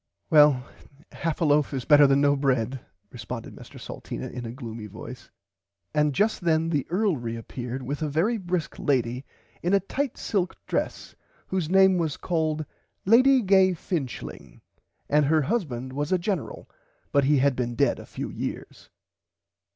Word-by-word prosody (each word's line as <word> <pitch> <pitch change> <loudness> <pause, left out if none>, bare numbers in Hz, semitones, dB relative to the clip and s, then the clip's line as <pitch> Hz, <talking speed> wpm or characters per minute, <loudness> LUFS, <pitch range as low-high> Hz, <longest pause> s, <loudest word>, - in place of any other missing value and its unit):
Well 150 -4 +6 0.5
half 165 -1 -3
a - - +3
loaf 145 -1 +2
is 130 - -4
better 145 -1 +7
than 135 +1 +3
no 145 0 +4
bread 130 -2 0 0.3
responded 115 0 -7
Mr - - -12
Salteena - - -7
in 120 -1 -6
a - - -5
gloomy 115 -4 -7
voice - - -10 0.6
and 150 -2 +2
just 215 - +1
then 165 -1 +1
the 145 -5 -1
earl 190 -1 +1
reappeard 120 +2 -5
with 140 +4 -4
a 155 - -1
very 195 +11 +1
brisk 175 -3 -3
lady 125 -1 0 0.4
in 180 +3 +2
a - - +5
tight 260 +7 -3
silk 190 -4 -1
dress - - -3 0.4
whose 185 -5 -1
name 190 -1 +5
was 160 -4 -1
called 155 -3 -1 0.4
Lady 255 +5 +5
Gay 190 -1 +5
Finchling 150 - -5 0.5
and 150 0 +3
her 155 +1 +3
husband 130 - -2
was 145 +3 -3
a 185 - +4
General 180 -3 -4 0.4
but 140 -1 +3
had 140 -1 +3
been 120 -1 -2
dead - - +2
a - - -11
few - - -6
years. - - -6
150 Hz, 160 wpm, -26 LUFS, 130-180 Hz, 0.6 s, better